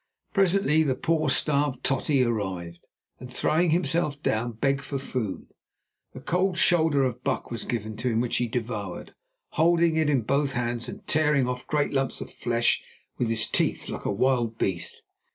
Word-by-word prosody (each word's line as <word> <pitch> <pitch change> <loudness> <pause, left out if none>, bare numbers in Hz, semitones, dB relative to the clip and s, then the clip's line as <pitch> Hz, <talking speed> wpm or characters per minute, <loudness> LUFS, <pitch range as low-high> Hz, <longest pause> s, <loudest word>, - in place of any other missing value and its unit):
Presently 190 -6 +3
the 140 -5 +1
poor, 160 -2 0
starved 140 -1 +1
"Totty" 135 0 +2
arrived, 95 -7 -3 0.3
and 125 0 -9
throwing 165 +7 +1
himself 160 -2 +1
down, 115 +2 0
begged 135 +4 0
for 140 - -3
food. 125 -6 -4 0.7
A - - -6
cold 180 +1 0
shoulder 160 -5 +3
of 125 -1 -2
buck 130 -4 -2
was 115 - -4
given 110 -3 -3
to 125 +3 -1
him, 115 -1 +1
which 120 0 0
he 120 - 0
devoured, 110 -5 -4 0.4
holding 165 0 +3
it 155 -2 +2
in 135 -5 +2
both 140 +3 +1
hands 120 -2 -2
and - - -9
tearing 150 -4 +3
off 125 0 -4
great 150 -1 0
lumps 135 -2 0
of - - -8
flesh 120 0 +1 0.4
with 120 - +1
his 115 -1 +1
teeth - - 0
like - - -6
a - - +1
wild 120 0 +1
beast. 90 -5 -2
130 Hz, 170 wpm, -26 LUFS, 115-150 Hz, 0.7 s, Presently